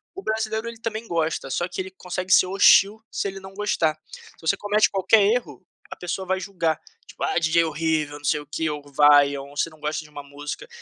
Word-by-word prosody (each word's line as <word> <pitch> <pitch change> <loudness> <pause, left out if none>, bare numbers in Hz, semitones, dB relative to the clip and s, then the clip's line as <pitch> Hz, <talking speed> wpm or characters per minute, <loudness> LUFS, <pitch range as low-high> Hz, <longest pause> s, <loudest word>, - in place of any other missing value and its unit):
O 385 - -6
brasileiro 220 +1 -2
ele 230 -1 -8
também 225 0 -4
gosta 160 -4 -1
só 175 +5 -1
que - - -7
ele 190 0 -8
consegue 185 0 -5
ser 185 - +6
hostil 195 +2 +5
se - - -2
ele 195 0 -6
não 190 0 -12
gostar. 180 -7 0
Se - - -15
você 160 - +1
comete 210 +1 +2
qualquer 195 +2 +4
erro, 200 - 0 0.3
a - - -5
pessoa 180 +2 -4
vai 190 0 0
julgar, 175 -5 -1 0.3
tipo - - -8
ah 395 - 0
DJ 165 +1 +3
horrível 155 -2 -1
não 145 - -12
sei 150 - +2
o 145 - -10
que, 160 +2 -2
ou 150 -1 -4
vaia, 145 -1 +5
ou 140 +1 -12
você 165 - +1
não 155 -1 -19
gosta 150 +1 -3
de 150 - -16
uma 145 -1 -9
música, 140 -1 -7
170 Hz, 230 wpm, -24 LUFS, 150-200 Hz, 0.3 s, ser